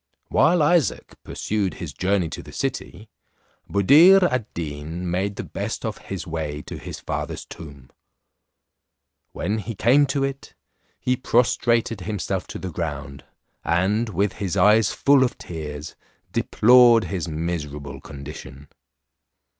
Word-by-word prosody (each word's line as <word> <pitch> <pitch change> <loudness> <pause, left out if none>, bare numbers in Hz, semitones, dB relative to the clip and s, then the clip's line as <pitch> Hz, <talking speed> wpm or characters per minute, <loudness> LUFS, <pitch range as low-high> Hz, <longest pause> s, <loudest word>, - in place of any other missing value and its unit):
While 160 +3 +4
Isaac 160 -1 +1
pursued 100 -3 -2
his - - -7
journey 95 -2 0
to - - -7
the - - -13
city, 100 +5 -4 0.6
Buddir 160 - +7
ad 130 -10 0
Deen 80 +2 -5
made 100 +3 -1
the - - -5
best - - -5
of - - -4
his 95 -1 -6
way 75 -3 -4
to - - -8
his - - -8
father's - - -4
tomb. 70 -5 -12 1.4
When 105 +5 -2
he 110 +2 -6
came 140 +8 +4
to 135 +1 -1
it, 135 0 -5 0.4
he 125 - +1
prostrated 115 -3 +1
himself 95 -2 -3
to - - -7
the 95 - -6
ground, 75 -4 -5 0.4
and, 100 +7 +1
with 100 0 0
his 100 -1 -1
eyes 105 +2 +5
full 140 -1 +4
of 125 - -1
tears, 75 -2 -7 0.4
deplored 120 0 +5
his 90 -4 -4
miserable 75 -3 -4
condition. 70 -1 -10
95 Hz, 130 wpm, -23 LUFS, 80-120 Hz, 1.4 s, Buddir